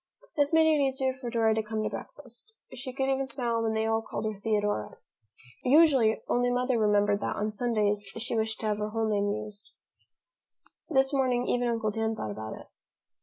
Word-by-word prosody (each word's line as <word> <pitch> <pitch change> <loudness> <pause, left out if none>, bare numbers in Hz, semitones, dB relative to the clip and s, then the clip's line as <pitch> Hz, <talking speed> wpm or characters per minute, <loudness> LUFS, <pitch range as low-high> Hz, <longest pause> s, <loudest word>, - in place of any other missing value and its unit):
This 290 -2 +2
made 320 -1 +5
it 310 -2 +3
easier 265 -1 0
for 255 -2 -6
Dora 225 -2 +2
to 220 - 0
come 215 0 -3
to - - -1
breakfast. 290 - -10 0.2
She 255 +1 -6
could 265 +1 -2
even 270 0 0
smile 240 -4 -1
when 225 -1 0
they 220 0 +1
all 225 0 +1
called 225 - -5
her 215 - -1
Theodora. 205 - -1 0.7
Usually, 270 -5 +4
only 245 0 +2
Mother 250 0 +1
remembered 205 -1 +3
that - - -2
on 210 +1 -1
Sundays 210 -2 0
she 230 +1 -2
wished 220 0 -1
to - - -3
have 210 -1 0
her 210 0 -2
whole 225 0 -1
name 205 -1 +1
used. 210 0 -6 1.2
This 270 -2 +2
morning 255 -3 +1
even 245 0 +1
Uncle 225 -2 0
Dan 225 +1 -1
thought 110 - -4
about 110 +1 -6
it. - - -12
225 Hz, 195 wpm, -28 LUFS, 215-260 Hz, 1.2 s, made